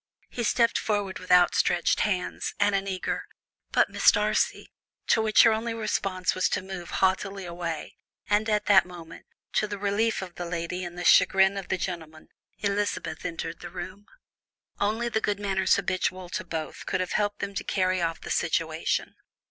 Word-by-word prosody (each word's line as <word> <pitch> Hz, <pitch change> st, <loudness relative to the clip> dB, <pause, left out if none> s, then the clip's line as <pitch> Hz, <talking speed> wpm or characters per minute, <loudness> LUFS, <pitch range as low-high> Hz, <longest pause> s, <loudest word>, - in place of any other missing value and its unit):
He 245 Hz, -, -4 dB
stepped 230 Hz, +1 st, +2 dB
forward 205 Hz, -3 st, -2 dB
with 185 Hz, 0 st, -7 dB
outstretched 175 Hz, -1 st, +4 dB
hands, 190 Hz, -4 st, -1 dB
and 205 Hz, 0 st, +3 dB
an 195 Hz, 0 st, 0 dB
eager, 185 Hz, -1 st, -3 dB, 0.4 s
"But, -, -, +3 dB
Miss -, -, +5 dB
Darcy -, -, 0 dB, 0.2 s
" -, -, -51 dB
to 225 Hz, -, +4 dB
which 215 Hz, -1 st, +5 dB
her 230 Hz, -, +6 dB
only 225 Hz, +1 st, -2 dB
response 195 Hz, -4 st, -1 dB
was 185 Hz, -, +1 dB
to -, -, -1 dB
move 190 Hz, -2 st, -7 dB, 0.2 s
haughtily 195 Hz, +1 st, -1 dB
away, 170 Hz, -2 st, -5 dB, 0.3 s
and 210 Hz, +2 st, +2 dB
at 210 Hz, -1 st, +1 dB
that 190 Hz, -3 st, +6 dB
moment, 175 Hz, -2 st, -11 dB, 0.3 s
to 215 Hz, -, +1 dB
the 205 Hz, -1 st, -5 dB
relief 205 Hz, +2 st, 0 dB
of 180 Hz, -2 st, -9 dB
the 175 Hz, -, -6 dB
lady 170 Hz, +1 st, -3 dB
and 175 Hz, 0 st, -7 dB
the 175 Hz, -, -4 dB
chagrin 190 Hz, +2 st, +5 dB
of 195 Hz, -2 st, -5 dB
the 190 Hz, -, 0 dB
gentleman, 165 Hz, -3 st, -6 dB, 0.3 s
Elizabeth 205 Hz, 0 st, -2 dB
entered 165 Hz, -1 st, -4 dB
the -, -, -8 dB
room. 185 Hz, +3 st, -8 dB, 0.7 s
Only 220 Hz, +4 st, 0 dB
the 220 Hz, -2 st, -1 dB
good 205 Hz, -1 st, -1 dB
manners 195 Hz, -2 st, +2 dB
habitual 185 Hz, -1 st, -2 dB
to 185 Hz, -, -3 dB
both 160 Hz, -3 st, -6 dB
could 185 Hz, -, 0 dB
have 185 Hz, -, -2 dB
helped 205 Hz, -1 st, 0 dB
them 200 Hz, -, -4 dB
to -, -, -3 dB
carry 185 Hz, -1 st, 0 dB
off 165 Hz, -1 st, -2 dB
the -, -, -6 dB
situation. -, -, 0 dB
190 Hz, 180 wpm, -27 LUFS, 180-205 Hz, 0.7 s, her